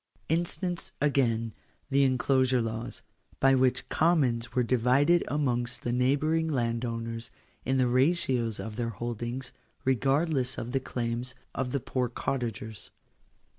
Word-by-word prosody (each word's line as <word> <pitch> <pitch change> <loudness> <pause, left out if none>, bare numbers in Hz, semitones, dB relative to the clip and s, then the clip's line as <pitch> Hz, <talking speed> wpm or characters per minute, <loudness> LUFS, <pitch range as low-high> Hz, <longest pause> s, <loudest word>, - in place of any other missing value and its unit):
Instance 175 +2 -1
again 115 -6 +1 0.4
the 140 +1 +4
In 130 -1 +3
closure 130 -1 +3
Laws, 115 0 -4 0.4
by 135 0 +5
which 130 -1 +2
commons 135 -8 +2
were 125 - +3
divided 130 +8 +3
amongst 120 -4 -1
the 120 - -1
neighbouring 145 +6 +2
landowners, 115 -3 -2 0.4
in 130 +2 +1
the 130 - +4
ratios 125 - +1
of 110 -1 -6
their 120 -1 -1
holdings, 120 +3 -4 0.3
regardless 135 +1 +1
of 115 - -4
the 135 - +1
claims 120 -1 -3 0.2
of 130 -2 -2
the 140 - 0
poor 125 -1 -1
cottagers. 120 -3 -4
125 Hz, 130 wpm, -29 LUFS, 115-135 Hz, 0.4 s, by